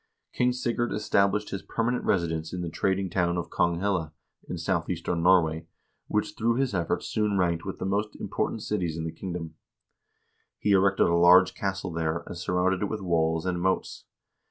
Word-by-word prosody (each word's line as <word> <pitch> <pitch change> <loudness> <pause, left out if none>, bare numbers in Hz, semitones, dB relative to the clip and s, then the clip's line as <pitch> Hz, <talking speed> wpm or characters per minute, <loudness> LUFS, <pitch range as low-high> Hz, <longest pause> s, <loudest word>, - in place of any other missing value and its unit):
King 125 0 +2
Sigurd 120 -1 -1
established 105 0 +1
his 95 - -3
permanent 120 +2 -1
residence 80 -3 0
in 90 - -3
the 85 -2 -4
trading 95 +3 0
town 90 -1 0
of 85 -1 -4
Konghelle, 85 -2 0 0.4
in 90 - -3
southeastern 85 -1 -1
Norway, 80 -3 +3 0.4
which - - -1
through 115 +1 +1
his 135 -2 0
efforts 85 -3 -1
soon 105 -2 0
ranked 85 -2 0
with 95 - -5
the - - -4
most 105 +2 -1
important 110 - -3
cities 90 -6 -2
in 80 - -3
the 80 - -3
kingdom. 85 -3 -6 1.0
He 105 - 0
erected 95 0 +4
a 85 - +2
large 90 +2 +6
castle 95 -2 -3
there, 80 0 -1
and - - -7
surrounded 90 +2 0
it 105 - -1
with 110 -1 -4
walls 80 -2 +1
and 90 -1 -1
moats. 95 +1 -1
90 Hz, 175 wpm, -27 LUFS, 85-100 Hz, 1.0 s, large